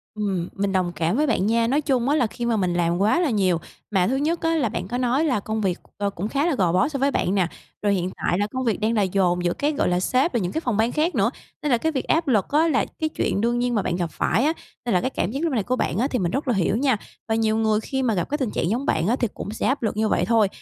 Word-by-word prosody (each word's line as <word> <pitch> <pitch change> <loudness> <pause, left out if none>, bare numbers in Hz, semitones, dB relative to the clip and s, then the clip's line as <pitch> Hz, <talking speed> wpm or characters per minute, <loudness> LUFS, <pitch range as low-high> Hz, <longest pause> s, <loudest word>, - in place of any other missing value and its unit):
Ừm, 195 -5 -2
mình 200 0 -1
đồng 185 -2 0
cảm 170 +5 0
với 300 +2 +2
bạn 220 -6 +1
nha! 230 +1 +2
Nói 280 +5 +2
chung 265 -3 +1
á 295 - +3
là 255 -6 +2
khi 240 +2 -5
mà 235 -2 +1
mình 180 -3 0
làm 170 0 +1
quá 210 - +3
là 345 -4 +2
nhiều, 190 -6 +2 0.3
mà 185 -3 +2
thứ 260 - +1
nhất 315 +5 0
á 330 0 +1
là 270 -8 +1
bạn 185 -1 -4
có 245 - -3
nói 255 +5 +1
là 255 -8 +1
công 220 +2 -3
việc, 185 -4 0 0.2
ờ, 200 0 0
cũng 195 +1 -4
khá 280 +6 0
là 340 -4 +1
gò 180 -8 +2
bó 180 - +3
so 280 -3 -4
với 275 +1 +2
bạn 190 - 0
nà. 185 -3 +2 0.3
Rồi 205 -1 +2
hiện 180 -1 -1
tại 175 - 0
là 205 - +1
công 260 +4 -4
việc 225 - 0
đang 220 +2 +1
là 215 - +2
dồn 180 -2 +1
giữa, 175 - +2
cái 295 +2 0
gọi 280 - +1
là, 180 0 +1
sếp 255 - +1
rồi 235 - +1
những 180 -1 -2
cái 320 - -2
phòng 245 -9 -1
ban 225 +2 +2
khác 320 +4 0
nữa, - - +2 0.3
nên 295 - 0
là 240 - +4
cái 320 +7 0
việc 270 -4 -2
áp 325 0 +1
lực 215 -8 +3
á 310 +3 +3
là 310 - +2
cái 315 -1 0
chuyện 200 - -1
đương 240 +1 +1
nhiên 245 0 0
mà 210 - +2
bạn 175 - -1
gặp 175 -2 -2
phải 220 +10 +1
á, 315 - +2 0.3
nên 235 - 0
là 180 - +3
cái 260 - 0
cảm 210 - -2
giác 280 +5 -3
lúc 325 - 0
này 220 -5 +1
của 250 +5 0
bạn 185 - -1
á 245 +5 +2
thì 255 - -1
mình 175 -3 0
rất 275 +1 -2
là 250 - +2
hiểu 195 -1 +1
nha! 260 -3 +2 0.3
Và 220 - +1
nhiều 220 -1 +1
người 220 -1 +2
khi 265 +4 -3
mà 235 -3 +2
gặp 175 -4 -1
cái 295 - 0
tình 255 -7 -2
trạng 170 - -1
giống 245 +6 -1
bạn 160 - +1
á 235 - +3
thì 245 - 0
cũng 205 - -6
sẽ 220 - -2
áp 270 0 0
lực 220 - -1
như 220 0 +2
vậy - - +1
thôi, 225 -2 +3
225 Hz, 330 wpm, -23 LUFS, 195-265 Hz, 0.3 s, là